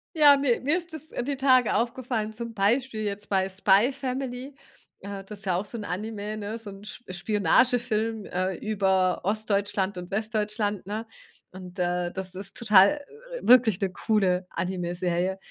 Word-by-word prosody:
Ja, 295 -2 +8
ne, 275 -4 +1
mir 295 +6 +2
ist 340 -2 -7
es 315 0 -6
die 275 +2 -3
Tage 255 -3 +4
aufgefallen, 235 -2 -1
zum 230 +1 -6
Beispiel 220 +3 +1
jetzt 205 0 -4
bei 190 -1 +2
„Spy 195 +5 +3
Family“, 260 +1 -4 0.5
äh, 200 0 -7
das 205 +1 -10
ist 205 - -9
ja 185 -2 +1
auch 190 +4 -1
so 235 - -7
'n 215 - -5
Anime, 210 +2 -4
so 220 -3 -8
'n 195 +1 -12 0.2
Sp 185 - -8
Spionagefilm, 220 +3 +1
äh, 185 +1 -2
über 190 -3 +1
Ostdeutschland 200 -1 0
und 180 0 -7
Westdeutschland, 210 -1 -2
ne? 215 +2 -4 0.5
Und, 185 0 -10
äh, 175 0 0
das 190 0 -5
ist 195 +1 -6
total 215 +4 +5 0.4
wirklich 235 -6 +5
'ne 195 -2 -1
coole 185 -3 +1
Animeserie. 180 +1 -2
210 Hz, 160 wpm, -26 LUFS, 190-235 Hz, 0.5 s, Ja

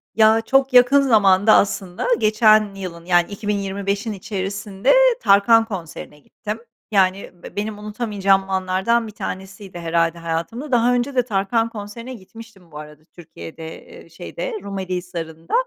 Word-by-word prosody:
Ya, 220 0 +5
çok 270 +3 +1
yakın 250 +3 +6
zamanda 210 -4 +4
aslında 195 - -1
geçen 215 -1 +3
yılın, 170 -3 -8
yani, 175 +1 +2
2025'in 200 +1 -3
içerisinde 200 +3 -2 0.3
Tarkan 225 +3 +4
konserine 165 -7 -8
gittim. 210 +8 -7 0.3
Yani 195 -1 +1
b - - -11
benim 210 0 -4
unutamayacağım 205 -3 0
anlardan 190 +5 0
bir 215 - -9
tanesiydi 190 -2 -8
herhâlde 170 0 0
hayatımda. 170 - -4
Daha 245 0 +3
önce 250 +3 -1
de 250 - +3
Tarkan 225 +1 0
konserine 230 +3 -8
gitmiştim 215 -4 -14
bu 150 - -10
arada 150 0 -12
Türkiye'de, 165 -1 -11
eee, - - -15
şeyde - - -7
Rumeli 190 -2 -4
Hisarı'nda. 165 -2 -7
200 Hz, 135 wpm, -20 LUFS, 185-225 Hz, 0.3 s, yakın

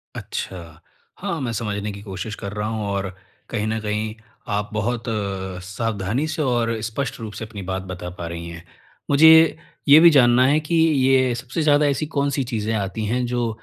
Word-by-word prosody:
अच्छा। 85 -4 -6 0.4
हाँ, 165 - -3
मैं 125 -3 -2
समझने 105 -2 -3
की 100 0 -9
कोशिश 100 +2 -6
कर 100 -2 -6
रहा 105 0 -2
हूँ 110 -2 -3
और, 100 -2 -3 0.3
कहीं 110 -2 -2
न 110 0 -1
कहीं 105 0 -2 0.4
आप 105 0 -3
बहुत 115 +2 -2
अ, 95 -4 -3
सावधानी 105 +6 -2
से 155 0 -3
और 120 -4 0
स्पष्ट 115 +6 -3
रूप 110 -2 -7
से 110 +2 -6
अपनी 105 -2 -8
बात 95 0 -2
बता 90 0 -6
पा 85 - -5
रही 85 0 -6
हैं। 85 0 -9 0.5
मुझे, 160 +2 +7 0.3
ये 145 +2 +9
भी 170 - +9
जानना 125 -4 +5
है 145 +3 +4
कि 155 +2 -2
ये 135 -5 +3
सबसे 125 +6 -4
ज़्यादा 150 0 +4
ऐसी 145 +2 0
कौन-सी 140 -1 +1
चीज़ें 110 0 -1
आती 105 +1 -2
हैं 125 +4 0
जो 120 -1 -1
110 Hz, 190 wpm, -22 LUFS, 100-135 Hz, 0.5 s, ये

